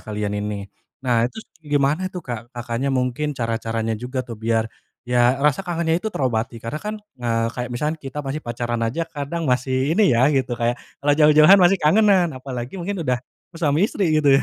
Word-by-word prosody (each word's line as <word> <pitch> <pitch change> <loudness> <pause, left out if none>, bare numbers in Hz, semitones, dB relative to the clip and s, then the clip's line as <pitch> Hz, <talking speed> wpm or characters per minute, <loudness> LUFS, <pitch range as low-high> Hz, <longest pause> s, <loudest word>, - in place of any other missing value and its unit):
kalian 105 -1 -3
ini? 105 -1 -4 0.4
Nah, 120 -1 +2
terus 220 - -10 0.2
gimana 150 +4 +1
tuh, 180 -2 -8
Kak, 120 -2 -6
Kakaknya 120 +3 -2
mungkin 135 +2 -1
cara-caranya 115 -1 -2
juga 125 +4 -4
tuh, 115 -2 -9
biar 115 0 +1 0.4
ya, 125 +1 +3
rasa 150 +4 +2
kangennya 165 0 0
itu 220 - -2
terobati, 120 - -1
karena 150 +6 -4
kan, 210 +1 -4 0.3
eee, 115 -1 0
kayak 125 0 -3
misalkan 150 +6 -2
kita 135 +1 -7
masih 140 +3 -3
pacaran 120 -1 -3
aja 165 +8 -2
kadang, 165 +1 -4
masih 130 +2 +1
ini 215 - +3
ya, 125 - +5
gitu, 130 -3 0
kayak, 120 +1 0 0.2
kalau 145 +1 +2
jauh-jauhan 155 +5 +7
pasti 180 +3 +5
kangenan, 185 +1 +4
apalagi 130 +1 -6
mungkin 180 -2 -3
udah 125 -2 0 0.4
suami 160 +5 +2
istri 175 -6 0
gitu, 140 -2 +5
ya? - - +2
135 Hz, 185 wpm, -22 LUFS, 120-155 Hz, 0.4 s, jauh-jauhan